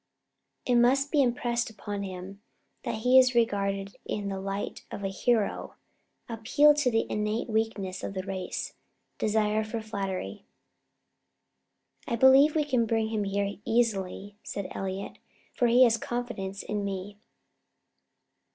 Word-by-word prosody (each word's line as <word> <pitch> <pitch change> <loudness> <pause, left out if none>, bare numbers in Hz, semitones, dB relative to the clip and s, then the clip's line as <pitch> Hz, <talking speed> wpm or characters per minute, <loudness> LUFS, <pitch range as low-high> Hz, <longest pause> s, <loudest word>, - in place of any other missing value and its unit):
It 245 -1 +3
must 270 +4 +3
be 295 - +4
impressed 240 -2 0
upon 205 -2 -6
him 190 +1 -7 0.4
that 220 - -4
he 255 +1 +8
is 255 -1 +4
regarded 200 -4 0
in 205 -1 -3
the 195 -1 -3
light 195 +1 -4
of 200 - -7
a 195 - -1
hero: 215 +2 0 0.5
appeal 245 +6 +4
to 290 -3 +1
the 225 -1 +1
innate 210 +2 -1
weakness 220 -4 -2
of 195 - -5
the 190 - -3
race 190 -1 -4 0.5
desire 215 0 +1
for 220 +1 -4
flattery." 195 - -4 1.6
"I 235 - 0
believe 265 +5 +6
we 305 -2 +2
can 250 -5 +1
bring 225 0 0
him 215 -2 -1
here 200 +1 -1
easily," 205 -3 -1
said 200 -2 -5
Elliott, 195 +1 -5 0.3
"for 245 - +2
he 245 +2 +6
has 230 -2 +4
confidence 225 -6 -4
in 210 -1 -3
me." 200 +1 -5
215 Hz, 140 wpm, -28 LUFS, 195-240 Hz, 1.6 s, he